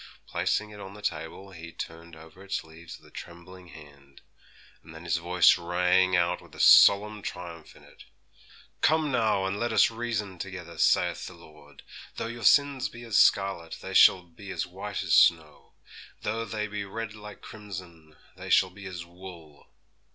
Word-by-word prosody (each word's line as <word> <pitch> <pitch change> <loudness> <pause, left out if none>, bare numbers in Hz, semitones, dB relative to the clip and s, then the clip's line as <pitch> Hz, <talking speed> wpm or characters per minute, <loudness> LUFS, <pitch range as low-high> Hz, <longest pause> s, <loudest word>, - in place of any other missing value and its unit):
Placing 105 0 -2
it 105 - -12
on 100 0 -10
the 105 - -13
table, 95 +1 -5
he 85 -2 -10
turned 85 +1 -9
over 80 +3 -15
its 100 - -4
leaves 80 +1 -12
with - - -23
a - - -18
trembling 90 +2 -11
hand; 70 -3 -16 0.6
and 80 - -14
then 80 - -11
his 85 0 0
voice 90 +1 +4
rang 90 +2 +2
out 85 0 +1
with - - -17
a - - -12
solemn 105 +1 +6
triumph 85 -4 -8
in - - -18
it, - - -17 0.8
'"Come, 155 -2 +2
now, 110 -6 +1
and 95 +2 -3
let 120 0 -1
us - - +4
reason 110 -5 -4
together, 90 -4 -8
saith - - +2
the 90 - -11
Lord: 75 -4 -17 0.3
though - - -4
your 120 +1 -7
sins 140 +1 +3
be 120 0 -12
as 115 -4 +1
scarlet, 95 -4 +2
they - - -7
shall 90 -1 +6
be 90 +3 -14
as 95 - -3
white 95 +3 -6
as - - -1
snow; 80 -3 +3 0.5
though 115 +2 -2
they 105 0 -3
be 105 -1 -5
red 110 +2 -6
like 105 -2 -12
crimson, 90 -7 -11 0.2
they - - -9
shall 95 - +4
be 95 +1 -10
as 85 -2 -7
wool." 85 -4 -13
95 Hz, 180 wpm, -27 LUFS, 85-105 Hz, 0.8 s, solemn